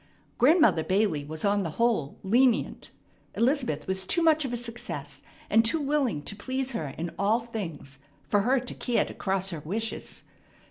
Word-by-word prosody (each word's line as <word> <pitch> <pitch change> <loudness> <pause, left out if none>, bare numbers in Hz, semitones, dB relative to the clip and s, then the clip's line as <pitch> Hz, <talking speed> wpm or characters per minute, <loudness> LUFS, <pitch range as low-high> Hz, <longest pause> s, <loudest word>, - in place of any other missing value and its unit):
Grandmother 300 - +5
Bailey 185 -6 +1
was 155 +5 -5
on 200 0 +2
the 170 - -2
whole 230 -12 +1
lenient. 240 +4 +2 0.5
Elizabeth 240 - +1
was 190 0 -1
too 340 - +1
much 315 -1 +4
of 265 - -3
a 240 - -1
success, 235 0 -6 0.3
and 225 - +4
too 230 +8 +1
willing 275 - 0
to - - -4
please 260 +5 -3
her 160 - -3
in 170 +1 -3
all 210 +4 +3
things, 170 - -7 0.3
for 205 - +3
her 255 +5 +3
to 245 - -6
care 245 - 0
to - - -8
cross 190 -1 -1
her 165 - -4
wishes. 215 +9 -4
220 Hz, 175 wpm, -27 LUFS, 185-255 Hz, 0.5 s, Grandmother